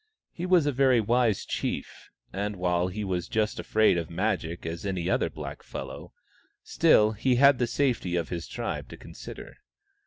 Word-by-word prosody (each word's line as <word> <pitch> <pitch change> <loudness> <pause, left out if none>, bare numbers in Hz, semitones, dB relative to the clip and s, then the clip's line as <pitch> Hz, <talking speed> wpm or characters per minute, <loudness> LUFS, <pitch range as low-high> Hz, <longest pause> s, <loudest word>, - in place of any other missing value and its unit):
He 175 +2 -5
was 180 -4 +4
a 145 - +2
very 130 -2 +4
wise 115 -1 +1
chief, - - -4 0.2
and 100 +2 -2
while 90 -1 +1
he 105 +3 -4
was 90 -3 -2
just 110 -1 -1
as - - -7
afraid 110 -5 +4
of 80 - -5
Magic 85 -3 -2
as 85 0 -5
any 95 -4 -2
other - - +1
blackfellow, - - -8 0.5
still 105 0 +4
he 125 +4 +1
had 140 +1 +6
the 120 - +1
safety 120 -9 0
of 85 -2 -1
his 85 -2 -4
tribe - - -4
to - - -10
consider. - - -10
105 Hz, 175 wpm, -27 LUFS, 90-120 Hz, 0.5 s, had